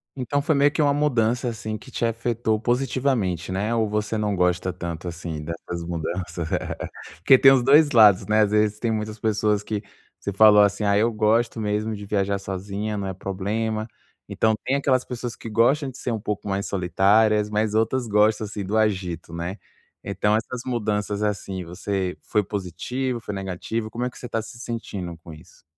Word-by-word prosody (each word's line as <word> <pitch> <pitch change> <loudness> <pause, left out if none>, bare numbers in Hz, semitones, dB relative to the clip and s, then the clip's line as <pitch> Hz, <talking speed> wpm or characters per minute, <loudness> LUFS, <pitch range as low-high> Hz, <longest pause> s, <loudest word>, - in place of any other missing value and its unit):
Então 140 +2 -1
foi 155 0 +1
meio 140 +1 +4
que 155 - 0
uma 145 -1 +3
mudança, 125 -5 +1
assim, 110 -1 -5
que 130 +5 -14
te - - -3
afetou 115 -1 0
positivamente, 120 - 0
né, 100 +5 -1
ou 110 -1 +1
você 105 +1 -1
não 105 -1 0
gosta 90 0 +1
tanto 85 -1 -6
assim 85 -2 -5
dessas 85 +1 -6
mudanças? 85 0 -4 0.7
Porque 95 +11 +6
tem 135 +1 +7
os 130 -2 +4
dois 145 +3 +6
lados, 105 -6 +6
né. 110 0 +4
Às 105 -1 +2
vezes 105 0 +2
tem 115 0 0
muitas 110 0 -3
pessoas 105 -1 +1
que 105 0 -3 0.4
você 100 - -4
falou 105 +1 +7
assim, 100 +1 +1
ah, 100 -1 +3
eu 115 +3 +3
gosto 115 +2 +1
mesmo 105 +1 -1
de 105 0 -8
viajar 100 -1 0
sozinha, 100 +2 -4
não 100 -1 -3
é 95 - -3
problema. 110 +4 -3 0.4
Então 110 0 +1
tem 135 - +1
aquelas 130 -2 +1
pessoas 120 -1 -5
que 115 - -8
gostam 135 +6 +2
de 130 - -11
ser 125 - -3
um 115 - -2
pouco 105 0 -4
mais 100 0 -1
solitárias, 105 +3 +3
mas 105 0 0
outras 115 +3 +1
gostam 105 +1 +3
assim 105 -1 -5
do 105 +4 -1
agito, 95 -7 -1
né. 85 +4 -4 0.5
Então 100 +2 +1
essas 115 +2 -3
mudanças 105 -4 -1
assim 100 -3 -2
você 90 +2 -3
foi 105 - +1
positivo, 115 +7 -3
foi 105 -2 -6
negativo? 95 +4 -4
Como 120 +1 -2
é - - -1
que 125 - -16
você - - -9
está 115 -2 -2
se 115 +2 -11
sentindo 105 -8 -5
com 80 0 -12
isso? 80 +3 -17
105 Hz, 190 wpm, -24 LUFS, 95-115 Hz, 0.7 s, tem